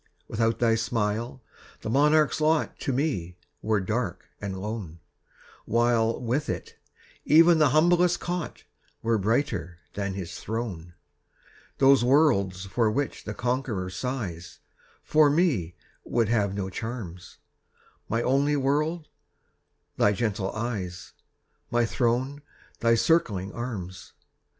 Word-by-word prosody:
Without 115 +1 0
thy 115 -2 +3
smile, 115 +2 -2 0.4
the - - -4
monarch's 150 +3 +3
lot 155 0 +1
To 140 - -2
me 125 - -2 0.2
were 110 -1 +1
dark 100 -1 -3 0.2
and 95 -2 -4
lone, 100 -5 -5 0.7
While, 115 0 +2
with 125 +4 -1
it, - - -5 0.5
even 165 +2 +6
the 150 -2 +5
humblest 175 +4 +3
cot 175 -2 -4 0.4
Were 115 -1 +2
brighter 100 - -1 0.2
than 100 -2 -3
his 95 -4 -6
throne. 95 -7 -5 0.8
Those 135 -2 +5
worlds 120 -9 +3
for 110 +3 +1
which 140 +6 -2
the 105 - -5
conqueror 120 -7 -2
sighs 90 -5 -5 0.5
For 155 -1 +4
me 140 - +1 0.3
would 115 -3 0
have 105 -4 +1
no 95 -2 -3
charms; 95 -6 -7 0.7
My 115 +1 0
only 140 +3 +2
world 150 +4 0 0.9
thy 105 - +4
gentle 100 -3 -1
eyes 100 -6 -4 0.6
My 120 0 +2
throne 130 +4 0 0.4
thy 115 0 +4
circling 105 - +1
arms! 95 -8 -6
115 Hz, 115 wpm, -26 LUFS, 100-140 Hz, 0.9 s, even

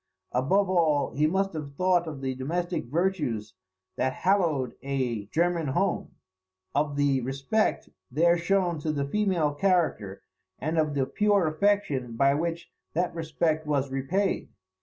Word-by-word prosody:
Above 190 +11 +2
all, 160 -6 +2
he 150 +4 +2
must 195 +3 0
have 145 -3 -6
thought 180 0 +2
of 150 -4 -6
the 130 -1 -1
domestic 170 +7 -2
virtues 145 - -1 0.4
that 130 0 0
hallowed 165 -10 +1
a 125 -7 -2
German 170 +4 +1
home; 175 +8 -1 0.6
of 145 0 0
the 140 -2 +2
respect 135 - 0 0.2
there 170 +6 +4
shown 175 -1 +1
to 155 +1 -1
the 140 -2 -1
female 175 -3 +1
character, 160 - 0 0.3
and 160 +3 -1
of 155 -2 0
the 135 -2 +2
pure 205 +3 +2
affection 155 - +1
by 140 +3 +4
which 165 +3 -3 0.2
that 175 +1 0
respect 160 -1 -1
was 140 -2 0
repaid. 170 +10 -1
155 Hz, 140 wpm, -27 LUFS, 135-175 Hz, 0.6 s, there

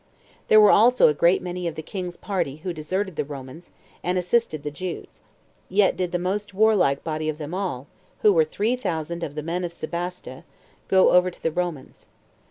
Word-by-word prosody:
There 215 - +7
were 210 -1 +7
also 245 0 +6
a - - +2
great 170 +5 +3
many 180 -1 -4
of 165 - -4
the 160 - -6
king's 180 0 -6
party 185 -9 -2
who 180 - -2
deserted 185 +3 -3
the - - 0
Romans, 140 +3 -10 0.3
and 180 +1 0
assisted 180 -4 0
the 150 - -4
Jews; 180 +4 -7 0.5
yet 195 +1 +3
did 180 -2 -2
the 175 - 0
most 195 +3 -3
warlike 200 -10 +3
body 155 -1 -2
of 155 - -3
them 155 +1 -7
all, 180 -9 -3 0.4
who 210 - +6
were 160 -3 +5
three 210 +10 -1
thousand 170 - -4
of 145 - -5
the 150 - -4
men 170 +3 -2
of 175 - -3
Sebaste, 175 +2 -6 0.5
go 190 -1 +5
over 180 0 +5
to 180 - -17
the 165 - +1
Romans. 170 -5 -5
175 Hz, 195 wpm, -24 LUFS, 155-190 Hz, 0.5 s, There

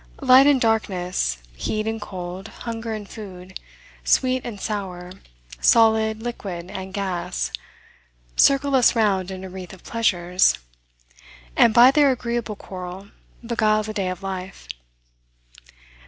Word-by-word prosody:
Light 265 +1 +7
and 285 -2 +5
darkness, 185 - 0 0.2
heat 215 - -2
and 225 0 -3
cold, 185 0 -7
hunger 225 0 -6
and 215 -2 -5
food, 185 -4 -10 0.4
sweet 255 -1 +2
and 220 -4 -7
sour, 185 -4 -5 0.5
solid, 220 - +4
liquid, 190 -7 -6
and 190 0 -6
gas, 185 - -3 0.8
circle 275 0 +4
us 255 -2 +5
round 195 -5 +1
in 190 0 -7
a 190 - -7
wreath 185 -1 -8
of 185 - -14
pleasures, 180 - +2 1.0
and, 230 - +6
by 240 +3 +7
their 290 0 +4
agreeable 235 -3 -3
quarrel, 185 0 -8 0.4
beguile 215 -2 +2
the 215 0 -5
day 195 -4 -1
of 185 +1 -6
life. 190 - -6
205 Hz, 125 wpm, -23 LUFS, 185-230 Hz, 1.0 s, Light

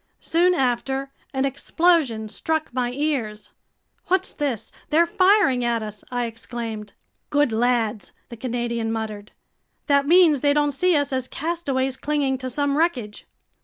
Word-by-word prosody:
Soon 355 +2 +2
after, 270 0 -1 0.2
an 265 0 0
explosion 275 -4 +1
struck 315 +7 -2
my 245 -1 -1
ears. 250 -7 -2 0.6
"What's 375 +1 +1
this? 275 -7 -3 0.2
They're 330 +3 +4
firing 370 - +3
at 235 -2 0
us!" 210 -1 -8
I 245 -1 -1
exclaimed. 225 -2 -6 0.4
"Good 290 -4 +2
lads!" 225 -2 0 0.2
the 235 - -8
Canadian 235 -1 -2
muttered. 215 -2 -5 0.5
"That 280 -1 +3
means 330 -5 +5
they 285 -1 +3
don't 295 0 +2
see 360 +6 +2
us 285 -2 0
as 260 -1 -1
castaways 275 -5 -2
clinging 280 -3 0
to 260 0 -4
some 285 +2 0
wreckage!" 250 -11 -1
265 Hz, 140 wpm, -23 LUFS, 235-300 Hz, 0.6 s, means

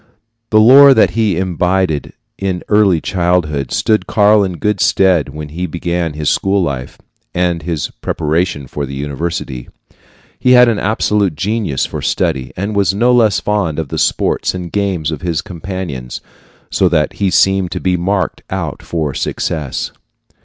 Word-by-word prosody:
The 110 - +4
lore 135 +5 +8
that 110 - +4
he 110 -6 0
imbibed 90 -3 0 0.3
in 95 -2 -2
early 105 -5 +4
childhood 85 -6 0
stood 110 -1 +1
Karl 105 0 +4
in 95 -2 -2
good 100 +4 -1
stead 90 -7 +3
when 75 +1 -7
he 90 +4 -4
began 85 0 -2
his 75 0 -4
school 95 +3 +1
life, 65 -6 -4 0.4
and 90 -2 0
his 80 -1 -3
preparation 80 -2 -1
for 70 +2 -5
the 70 - -7
university. 70 -2 -4 0.7
He 125 - +4
had 125 0 +7
an 115 -3 +1
absolute 105 -4 0
genius 100 -4 -1
for - - -6
study, 65 -1 -1
and 100 +3 -3
was 100 -1 +2
no 120 +4 +3
less 110 -5 +3
fond 100 -7 -1
of 80 -4 -3
the - - -3
sports - - 0
and 90 -2 -6
games 95 -6 -1
of 80 - -5
his 85 -3 -2
companions, 90 -9 -6 0.5
so 95 - +2
that 75 -3 +1
he 100 - +3
seemed 95 0 +2
to - - -3
be 90 -1 0
marked 90 +1 -1
out - - -4
for 80 -4 -3
success. 75 -1 -3
90 Hz, 160 wpm, -15 LUFS, 75-100 Hz, 0.7 s, lore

